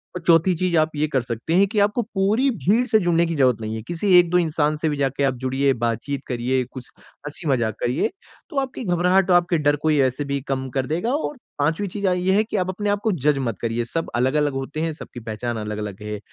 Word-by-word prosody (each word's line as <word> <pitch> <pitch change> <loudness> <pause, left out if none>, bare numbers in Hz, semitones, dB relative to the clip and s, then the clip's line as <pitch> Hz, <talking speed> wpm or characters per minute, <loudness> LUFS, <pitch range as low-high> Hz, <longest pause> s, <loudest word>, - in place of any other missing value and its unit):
और 180 - -4
चौथी 170 +2 +4
चीज 180 +1 0
आप 155 0 +2
ये 150 +1 +1
कर 130 - +3
सकते 120 +5 -4
हैं 195 +3 +5
कि 210 +1 -1
आपको 205 +4 +2
पूरी 215 +4 +1
भीड़ 220 +2 +2
से 220 -1 +4
जुड़ने 170 -2 +2
की 165 0 -2
ज़रूरत 130 -5 +2
नहीं 110 0 -4
है। 110 - -5
किसी 185 +3 0
1-2 175 0 +3
इंसान 155 -3 +1
से 155 +1 0
भी 145 - -2
जाके 140 0 0
आप 135 -1 +1
जुड़िए, 135 +1 +2
बातचीत 120 +4 -2
करिए, 125 +1 0
कुछ 125 0 -11
हँसी-मज़ाक 135 - -3
करिए। 120 - 0 0.4
तो 295 - -7
आपकी 265 -1 -4
घबराहट 180 0 +2
और - - +6
आपके 175 -1 +1
डर 145 -1 +2
को 155 - +4
ऐसे 140 -1 +1
भी 140 0 -2
कम 130 -1 -2
कर 135 -1 +1
देगा 175 - -1
और 295 -1 -2 0.2
पाँचवी 160 +8 0
चीज 200 +2 -4
अ, 185 - +3
ये 180 +1 +1
है 215 - +4
कि 215 -1 -4
आप 185 -1 0
अपने 205 +2 -2
आपको 205 +2 +1
जज 150 -2 +4
मत 115 - -3
करिए। 115 0 -1
सब 165 +7 -3
अलग-अलग 140 +4 +1
होते 135 +3 -4
हैं, 165 -1 -1
सबकी 140 -4 -10
पहचान 115 +1 -4
अलग-अलग 105 -1 -5
है। 105 0 -5
150 Hz, 235 wpm, -22 LUFS, 130-185 Hz, 0.4 s, और